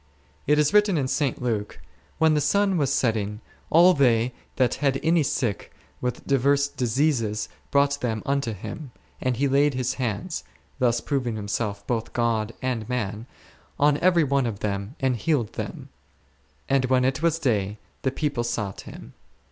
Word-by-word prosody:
It 150 +1 +4
is 150 +4 +3
written 210 -4 +4
in 135 -3 0
St. 135 -2 -1
Luke, 110 -4 -2 0.4
When 160 -1 +4
the 150 - +2
sun 200 +6 +2
was 140 -5 +1
setting, 110 -5 0 0.3
all 175 +3 +7
they 125 -4 +3 0.2
that 125 -3 +2
had 135 -2 +2
any 165 0 +3
sick 130 - -2 0.3
with 125 -1 -3
divers 140 +1 +3
diseases 120 -5 0 0.2
hrought 140 0 +3
them 110 -3 -2
unto 140 -4 0
Him, 135 - -7 0.3
and 130 -2 0
He 140 +3 +2
laid 140 +1 +3
His 130 0 -1
hands 120 - -3 0.4
(thus 120 -2 +2
proving 130 -6 -1
Himself 100 -1 -3
both 115 -2 -2
God 115 -2 0
and 120 -3 -2
man) 110 -2 -3 0.5
on 145 0 +4
every 175 -2 +4
one 140 -3 +1
of 105 -3 -5
them 100 +4 -3
and 130 -2 +1
healed 120 -1 0
them; - - -6 0.8
and 135 -1 +2
when 130 0 +2
it 135 +4 0
was 165 -1 +2
day 105 -9 0
— - - -39
the 130 - +1
people 140 -2 -1
sought 105 -4 -3
Him. - - -11
130 Hz, 165 wpm, -25 LUFS, 115-145 Hz, 0.8 s, all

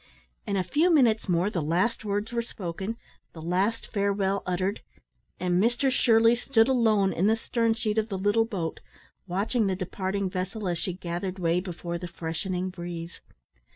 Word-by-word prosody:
In 200 - 0
a 185 - +1
few 300 - +2
minutes 235 - +4
more 180 +4 +2
the 175 - -1
last 180 +10 0
words 205 +2 -2
were 235 - +1
spoken, 200 -1 -5 0.4
the 160 - -9
last 190 +7 0
farewell 200 -1 0
uttered, 185 +3 -1 0.6
and 180 0 +2
Mr 240 +4 +2
Shirley 230 -2 +5
stood 240 -1 +3
alone 220 -7 +3
in 185 +5 +2
the 220 - +4
stern 230 0 0
sheet 220 -1 0
of 220 +1 -2
the 195 - -2
little 205 +4 +2
boat, 185 -8 -3 0.5
watching 205 +5 +1
the 190 - 0
departing 190 +1 -2
vessel 185 +3 -3
as 175 -2 -1
she 185 - -2
gathered 180 +1 -4
way 170 -1 +1
before 175 -2 -5
the 180 - -5
freshening 180 +3 -3
breeze. 175 -2 -7
195 Hz, 170 wpm, -27 LUFS, 180-225 Hz, 0.6 s, Shirley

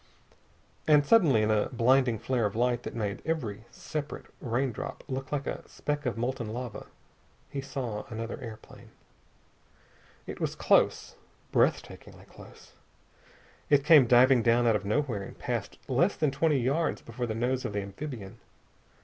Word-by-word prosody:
And 150 -2 +5
suddenly, 145 - +5
in 110 - +2
a 105 -1 +1
blinding 125 0 +3
flare 120 0 0
of 100 - -8
light 120 +1 +1
that - - -7
made 105 -3 -3
every 115 -10 -3
separate 150 +5 -6 0.2
raindrop 125 -1 -3
look 130 0 -5
like 140 -2 -2
a - - -4
speck 145 -2 -3
of 120 - -2
molten 120 0 -2
metal, 120 -1 -6 0.6
he 140 - -3
saw 125 -6 -5
another 115 +1 -5
airplane. 110 -2 -11 1.4
It - - -7
was - - -1
close. - - +2 0.4
Breath - - +3
takingly - - -14
close. - - -15 1.0
It 140 -1 +4
came 150 -6 +7
diving 125 +1 +6
down 120 +1 +3
out 115 -2 +4
of 100 -1 -2
nowhere 115 -1 0
and 100 - -9
passed - - -4
less - - +2
than 150 -3 +1
twenty 145 +1 +2
yards 140 +7 0
before 120 +1 -4
the 110 - -3
nose 125 +3 -1
of 105 - -4
the 100 - -1
amphibian. 100 0 -8
125 Hz, 155 wpm, -29 LUFS, 110-140 Hz, 1.4 s, came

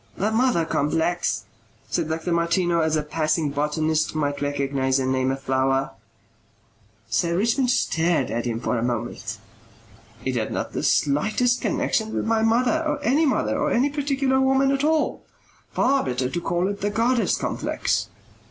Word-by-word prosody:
"The 210 +3 0
mother 225 -7 +2
complex," 165 +4 0 0.4
said 155 - -1
Dr. 160 +2 -2
Martineau 170 +1 +1
as 160 -1 +1
a 155 - 0
passing 155 0 0
botanist 155 +2 0
might 145 -2 -1
recognize 140 -2 0
and 130 -1 0
name 130 0 +1
a 135 - -1
flower. 135 0 0 1.2
Sir 170 -1 0
Richmond 235 +5 +1
stared 170 - +1
at 120 +1 -2
him 115 -1 -2
for 120 0 -1
a - - -2
moment. 115 -1 -3 0.9
"It 130 -1 -1
had 110 - -2
not - - -3
the - - -2
slightest 215 - +1
connexion 240 -7 -1
with - - -1
my 225 0 +1
mother 245 +8 +2
or 300 -2 -1
any 295 +5 +3
mother 270 - 0
or - - 0
any 270 +4 +2
particular 275 -2 +1
woman 270 +1 +3
at 275 0 0
all. 310 0 +1 0.5
Far 275 +2 +2
better 125 0 -2
to 175 - -2
call 175 +2 0
it 200 0 -4
the 205 - 0
goddess 230 +3 +1
complex." - - -1
170 Hz, 160 wpm, -23 LUFS, -, 1.2 s, any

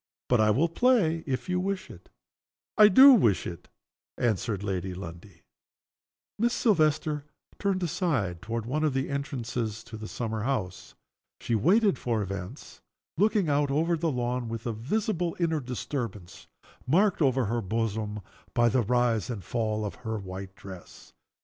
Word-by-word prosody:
But 125 -3 +4
I 110 - +4
will 135 +11 +3
play 170 -5 +2
if 130 -2 -2
you 180 0 0
wish 195 0 -3
it." - - -15 0.7
"I 210 -2 +8
do 265 +7 +9
wish 115 - +3
it," 85 - -7 0.5
answered 110 -3 -1
Lady 95 -2 -3
Lundie. 85 -1 -10 1.0
Miss 235 +2 +2
Silvester 155 - +1 0.3
turned 195 -2 0
aside 130 - -1
toward 115 0 -4
one 150 +6 -1
of 150 -4 +1
the 135 +1 -1
entrances 120 -6 -3
into 110 - -9
the 110 0 -7
summer 110 -2 -3
house. 105 -7 -3 0.4
She 120 - -3
waited 190 - +3
for 115 -4 -1
events, 95 -1 -7 0.3
looking 205 0 +2
out 145 -1 +2
over 160 +5 +1
the 165 0 -1
lawn, 125 -1 -2
with 115 0 -5
a 120 - -1
visible 175 - -1
inner 160 -3 +1
disturbance, 120 -6 -5 0.4
marked 185 +6 +3
over 130 -3 +3
the 115 +3 -1
bosom 105 0 -2 0.3
by 120 -1 +4
the 125 +3 +2
rise 120 0 +1
and 110 -6 -5
fall 110 -2 -2
of 105 - -4
her 110 -2 -3
white 95 -1 -8
dress. 95 -3 -12
125 Hz, 155 wpm, -28 LUFS, 105-160 Hz, 1.0 s, do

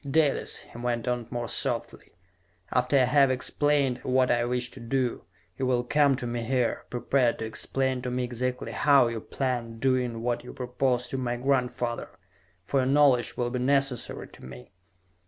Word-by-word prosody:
"Dalis," 150 0 +1
he - - -14
went 120 -1 -2
on, 120 -2 -1
more 120 -1 -3
softly, - - -3 0.6
"after 125 +3 +2
I 130 - +5
have 135 +2 +4
explained 135 0 +1
what 130 0 +2
I 120 0 +2
wish 125 0 0
to - - -10
do, 125 -4 -2 0.3
you 130 - 0
will 125 -1 +1
come 140 +2 +3
to 125 -1 -4
me 120 0 -3
here, 125 0 -1
prepared 125 0 +1
to 110 - -4
explain 130 +3 -1
to 125 - -3
me 125 0 -1
exactly 125 +1 -3
how 140 -4 +4
you 115 -2 -4
planned 120 -4 -3
doing 125 -3 0
what 120 0 -1
you 125 - -9
proposed 125 -1 -1
to 135 - -2
my 120 -1 -1
grandfather 125 -2 -1 0.5
for 135 +9 0
your 130 - +1
knowledge 135 -3 +3
will 120 -1 -1
be 125 - -2
necessary 135 -1 0
to - - -16
me...." 60 -1 -11
125 Hz, 175 wpm, -27 LUFS, 120-135 Hz, 0.6 s, I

